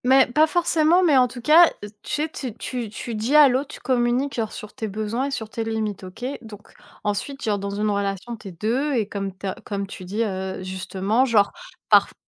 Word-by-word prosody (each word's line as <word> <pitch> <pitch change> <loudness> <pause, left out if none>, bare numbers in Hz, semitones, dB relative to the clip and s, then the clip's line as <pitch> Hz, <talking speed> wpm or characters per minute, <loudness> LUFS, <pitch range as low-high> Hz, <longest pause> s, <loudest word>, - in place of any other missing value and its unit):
Mais 265 +1 +6
pas 305 +6 +3
forcément 340 +1 +3
mais 315 -5 +4
en 255 -1 +5
tout 245 0 -9
cas 320 +6 +7 0.3
tu - - -8
sais, - - 0
tu 255 -7 -6
tu 245 -4 -4
tu 230 +2 -6
dis 225 +7 0
à 300 -1 +9
l'autre, 260 +3 0
tu - - -12
communiques 250 +2 +1
genre 220 -2 -2
sur 210 - -9
tes 220 - -4
besoins 215 +5 -2
et 280 - -3
sur 225 -5 -4
tes 225 +1 -4
limites, 220 -3 -3
OK. 185 +6 -8 0.2
Donc 215 -3 -13 0.3
ensuite, 245 +7 -3
genre 205 -2 0
dans 200 +1 -4
une 205 +2 -1
relation 200 +3 -2
tu 215 -2 -12
es - - -7
2 240 - -1
et 220 -4 0
comme 195 -2 -4
tu 190 - -8
as 190 - -1
comme 200 -1 -3
tu 195 -1 -9
dis, 205 +5 -1
heu, 190 -2 -4
justement, 190 +5 0
genre 215 -5 +3 0.4
parf - - +5
225 Hz, 225 wpm, -23 LUFS, 200-260 Hz, 0.4 s, à